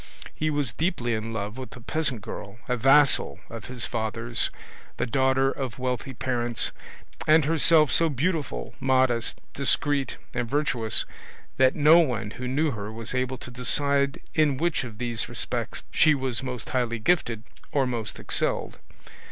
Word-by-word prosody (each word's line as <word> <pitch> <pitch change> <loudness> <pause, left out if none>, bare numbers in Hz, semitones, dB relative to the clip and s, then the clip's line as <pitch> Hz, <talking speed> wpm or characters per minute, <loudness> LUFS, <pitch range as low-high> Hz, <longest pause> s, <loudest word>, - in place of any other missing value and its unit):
He 155 - -1
was 145 -6 -1
deeply 125 - -1
in 110 +1 -3
love 110 +2 -4
with 130 - -8
a - - -10
peasant 135 -2 -1
girl, 105 +1 -8
a 125 - +1
vassal 135 +4 +4
of 115 -2 -7
his 125 -1 -2
father's, 115 +1 -1 0.5
the - - 0
daughter 130 +1 +2
of 130 -5 -5
wealthy 130 +1 -3
parents, 120 -2 0 0.6
and 155 -1 +5
herself 160 0 +5
so 165 -1 +4
beautiful, 145 - -2
modest, 130 -3 +2
discreet, 140 -1 0 0.2
and 120 -1 -2
virtuous, 125 -6 +1 0.5
that 130 0 +4
no 155 +3 +7
one 120 -10 0
who 125 +2 -6
knew 145 +4 +1
her 105 -2 -5
was 115 +1 -5
able 130 0 -1
to 125 - -8
decide 140 +3 +1
in 150 -4 +2
which 170 0 0
of 115 -4 -8
these 120 -3 -2
respects - - -3
she 155 -2 +5
was 130 -3 -2
most 125 -3 -5
highly 120 -2 0
gifted 115 -3 0 0.3
or 140 -2 +2
most 115 -4 -4
excelled. - - -1
130 Hz, 155 wpm, -26 LUFS, 115-145 Hz, 0.6 s, no